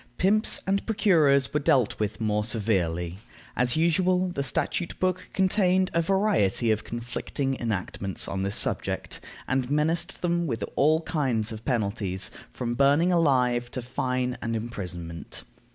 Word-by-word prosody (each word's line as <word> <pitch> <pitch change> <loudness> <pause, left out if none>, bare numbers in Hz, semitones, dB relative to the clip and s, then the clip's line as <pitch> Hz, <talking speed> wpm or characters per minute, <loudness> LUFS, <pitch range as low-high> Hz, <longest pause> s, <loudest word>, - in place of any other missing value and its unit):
Pimps 210 +4 +3
and 195 +1 +1
procurers 160 - +3
were 150 - +2
dealt 130 -5 +2
with 105 -1 -2
more 105 -1 0
severely. 95 -6 -1 0.4
As 125 0 +2
usual, 180 +3 +2
the 155 -6 -3
statute 155 +5 -1
book 185 0 -1
contained 185 -1 +2
a 170 - +3
variety 165 - +2
of 110 0 0
conflicting 120 +3 -3
enactments 100 -3 -1
on 95 - -3
this 100 +2 -1
subject, - - -1 0.3
and 130 -1 0
menaced 155 +5 0
them 170 -1 +1
with 115 -6 -2
all 155 +3 +3
kinds 130 -10 -1
of 110 0 -8
penalties, 100 -5 -1 0.2
from 120 -1 -3
burning 145 +7 +3
alive 125 -8 +2
to 125 - -5
fine 125 0 -2
and 115 -1 -2
imprisonment. 90 -7 -6
125 Hz, 140 wpm, -26 LUFS, 110-170 Hz, 0.4 s, Pimps